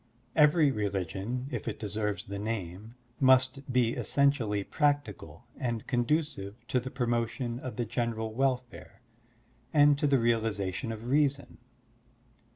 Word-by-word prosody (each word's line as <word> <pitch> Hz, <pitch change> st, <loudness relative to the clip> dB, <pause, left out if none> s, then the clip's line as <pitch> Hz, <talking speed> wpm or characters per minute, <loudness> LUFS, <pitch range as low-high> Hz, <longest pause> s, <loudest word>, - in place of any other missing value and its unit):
Every 150 Hz, -1 st, +5 dB
religion, 105 Hz, +3 st, -3 dB
if -, -, -4 dB
it 115 Hz, -, -3 dB
deserves 105 Hz, -1 st, -2 dB
the 100 Hz, 0 st, -5 dB
name, 105 Hz, 0 st, -5 dB, 0.2 s
must 130 Hz, 0 st, +3 dB
be 120 Hz, -2 st, +2 dB
essentially 130 Hz, -10 st, +1 dB
practical 120 Hz, -, -1 dB
and 120 Hz, -4 st, -3 dB
conducive 125 Hz, -5 st, -1 dB
to 130 Hz, -, +2 dB
the 130 Hz, +1 st, -6 dB
promotion 120 Hz, 0 st, -2 dB
of 130 Hz, -1 st, -6 dB
the 120 Hz, -, -1 dB
general 110 Hz, -1 st, -2 dB
welfare 125 Hz, -1 st, -2 dB, 0.7 s
and 145 Hz, -1 st, +5 dB
to 145 Hz, -, +2 dB
the 140 Hz, -1 st, +4 dB
realization 115 Hz, -3 st, 0 dB
of 115 Hz, +3 st, -6 dB
Reason. 140 Hz, -1 st, +1 dB
120 Hz, 125 wpm, -29 LUFS, 105-135 Hz, 0.7 s, Every